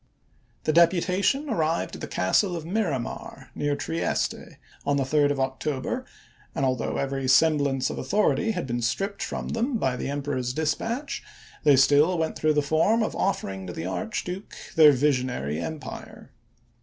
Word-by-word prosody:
The 155 - +1
deputation 185 - +3
arrived 165 - 0
at - - -8
the - - -4
castle 175 - +1
of 165 -2 -5
Miramar, 170 - -3
near 145 0 -1
Trieste, 165 +3 -2 0.3
on 140 0 +1
the 140 - +1
3d 145 +2 +2
of 145 -1 -1
October, 130 +1 -2 0.5
and, 135 - +1
although 130 -3 -1
i863. - - -1
every 135 -1 -2
semblance 140 -1 +3
of - - -5
authority 215 +2 +1
had 185 -8 -1
been 120 -1 -2
stripped 195 - -2
from - - -4
them 235 +2 0
by 130 -11 0
the 125 - -4
Emperor's 140 -3 -2
dispatch, 225 - -2 0.4
they 145 -2 +6
still 145 +6 +4
went 160 -1 -1
through 155 0 +2
the 150 -1 +2
form 165 +10 +2
of - - -3
offering 95 - -2
to 90 - -5
the 80 - -5
Archduke 180 - -4 0.2
their 155 -2 +8
visionary 125 - 0
empire. 150 - -7
150 Hz, 160 wpm, -26 LUFS, 130-180 Hz, 0.5 s, their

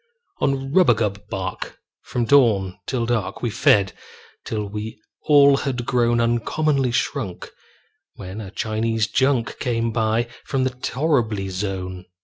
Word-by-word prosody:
On 135 -1 0
rubagub 110 - +2
bark, 95 -1 -5 0.2
from 120 -1 -2
dawn 105 -8 +3
to 125 -3 -1
dark, 110 -5 -2
We 120 - 0
fed, 100 -1 +3 0.5
till 105 -2 -3
we 105 +2 -6 0.3
all 140 -2 +7
had 125 -4 -3
grown 120 -2 +2
Uncommonly 130 +4 +1
shrunk, 120 -5 -2 0.6
when 95 +3 -7
a 100 - -7
Chinese 110 +1 -1
junk 130 0 0
Came 115 -2 0
by 110 +1 +1 0.2
from 135 -2 -1
the 130 - +1
torriby 125 -6 -1
zone. 95 -1 -4
115 Hz, 125 wpm, -22 LUFS, 105-130 Hz, 0.6 s, all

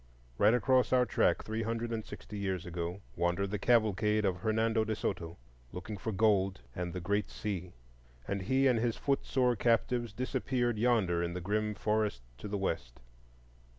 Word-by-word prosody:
Right 105 +3 +6
across 130 +1 +3
our 125 -1 +4
track, - - +2
three 110 +1 -3
hundred 115 +1 -2
and 110 -1 -2
sixty 105 - -9
years 95 -3 -2
ago, 90 +2 -4
wandered 90 +3 0
the 105 - -2
cavalcade 105 -2 +3
of 95 -2 +1
Hernando 110 +3 +1
de 110 0 -2
Soto, 85 -5 -3 0.3
looking 105 - -6
for 105 +3 -4
gold 100 -2 +2
and 90 -2 -3
the 90 - -4
Great 100 +4 -1
Sea; 90 -4 -4 0.5
and 100 -1 -2
he 130 +8 +2
and 125 -4 +4
his 115 0 0
foot 140 -1 0
sore 125 -2 +2
captives 120 +1 +1
disappeared 120 0 -1
yonder 105 -8 +2
in 85 0 -2
the - - -2
grim 105 +3 -1
forests 105 - 0 0.2
to - - -6
the 100 0 -2
west. 65 -10 -3
105 Hz, 175 wpm, -32 LUFS, 95-115 Hz, 0.5 s, Right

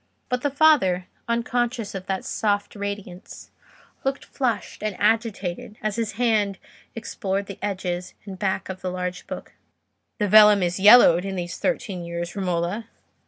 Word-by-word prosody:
But 250 0 -1
the 285 - +1
father, 275 - +4 0.2
unconscious 235 -1 -1
of 190 -1 -7
that 190 -1 -2
soft 205 -1 -1
radiance, 200 -3 -7 0.5
looked 270 +1 -2
flushed 240 -6 -2
and 215 -2 -2
agitated 210 -3 -1
as 215 -1 -1
his 225 -2 -2
hand 215 -4 +1 0.4
explored 200 -3 -3
the 195 -1 -9
edges 185 -3 -3
and 190 -2 -8
back 190 -2 -1
of 185 -1 -7
the 185 - -2
large 180 0 -4
book. - - -8 0.6
"The 210 - 0
vellum 210 -1 +7
is 175 +1 -1
yellowed 200 -4 +8
in 195 -1 -4
these 175 -1 -5
thirteen 200 -9 -2
years, 170 +1 -5
Romola." 185 +3 -2
200 Hz, 150 wpm, -24 LUFS, 185-225 Hz, 0.6 s, yellowed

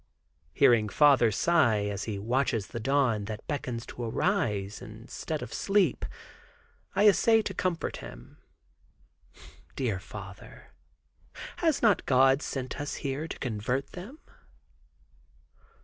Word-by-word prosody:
Hearing 110 -3 +4
father 140 -3 +5
sigh, 115 -5 +2
as 100 -1 -3
he 105 -3 -3
watches 115 0 0
the 115 - -5
dawn 120 -4 +1
that 110 0 -7
beckons 125 -5 -4
to - - -9
arise 110 - -1
instead 125 +6 -6
of 110 - -8
sleep, 195 - +1 0.9
I 205 +2 +5
essay 225 +2 +5
to 195 - -4
comfort 180 -2 -2
him. - - -12 1.4
"Dear 115 -8 -1
father, 100 0 -11 0.9
has 320 -7 +1
not 210 -5 +3
God 135 +1 +4
sent 130 -1 -4
us 145 - -4
here 140 +4 -2
to - - -6
convert 125 +3 -2
them?" 205 +12 -9
130 Hz, 115 wpm, -28 LUFS, 110-160 Hz, 1.4 s, father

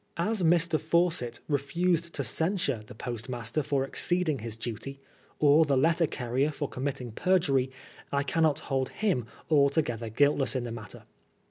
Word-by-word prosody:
As 205 +4 0
Mr. 165 -1 +3
Fawcett 160 -7 0
refused 165 +4 0
to - - -1
censure 160 - 0
the - - -11
post 120 +1 -5
master 120 +3 -2
for 140 -2 0
exceeding 160 +1 0
his 110 0 -5
duty, 120 +4 -6 0.4
or 150 +2 +6
the 140 -3 +1
letter 165 +4 +3
carrier 130 +4 -1
for 145 -1 -3
committing 130 -2 -4
perjury, 140 - +2 0.4
I 140 0 +1
cannot 155 +1 +2
hold 135 -1 -1
him 165 - -1 0.2
altogether 140 -6 +2
guilt 145 +6 +3
less 135 - 0
in 130 - 0
the 120 - -5
matter. 115 -2 -9
140 Hz, 155 wpm, -28 LUFS, 125-165 Hz, 0.4 s, or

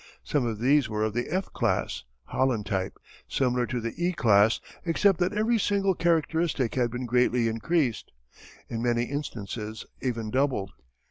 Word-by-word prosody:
Some 140 -5 0
of 110 -2 -2
these 130 +3 +3
were 105 0 -1
of 110 -1 0
the 120 +2 -1
"F" 185 +3 -2
class - - -1 0.2
(Holland 125 - 0
type), 95 -2 -2 0.3
similar 125 -2 +1
to 125 - -2
the 115 0 -4
"E" 180 +1 +2
class 110 - +4 0.2
except 180 +2 +3
that 180 +1 +2
every 220 +2 +1
single 200 -1 +2
characteristic 165 -6 +1
had 125 -2 +1
been 125 +2 -4
greatly 125 0 +2
increased, 120 +3 0 0.6
in 115 -1 -4
many 120 0 +1
instances 110 -5 -5 0.2
even 115 -4 -2
doubled. 130 -7 0
125 Hz, 155 wpm, -27 LUFS, 115-160 Hz, 0.6 s, class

